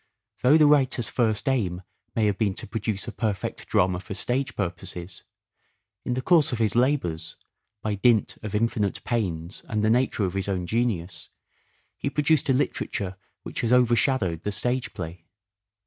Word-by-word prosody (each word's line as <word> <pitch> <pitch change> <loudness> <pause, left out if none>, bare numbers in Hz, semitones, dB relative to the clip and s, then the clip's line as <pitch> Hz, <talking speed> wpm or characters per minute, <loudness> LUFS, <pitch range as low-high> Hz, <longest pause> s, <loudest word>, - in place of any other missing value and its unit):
Though 140 +5 +6
the 155 - +6
writer's 135 -5 +3
first 110 -2 0
aim 95 -9 0 0.3
may 110 - +2
have 100 -2 0
been 100 -4 +1
to - - -4
produce 105 -2 -3
a - - -3
perfect 105 -3 -3
drama 90 -1 +2
for 95 +2 -7
stage 130 +5 +1
purposes, 90 -1 -4 0.8
in 125 - -1
the 130 - -2
course 165 -6 +4
of 120 - -1
his 110 -1 +1
labours, 90 - 0 0.5
by 110 - 0
dint 110 +2 +3
of 105 -1 -5
infinite 105 -2 0
pains 95 -6 -2
and 110 -2 0
the 110 - +4
nature 120 -3 +2
of 90 - -3
his 95 0 -2
own 95 -3 -1
genius, 100 -5 -2 0.7
he - - -1
produced 150 0 +2
a - - +5
literature 100 -7 -1 0.3
which - - -4
has 115 - 0
overshadowed 120 - +3
the 105 - -2
stage 120 +4 0
play. 85 -1 -7
110 Hz, 165 wpm, -25 LUFS, 95-125 Hz, 0.8 s, Though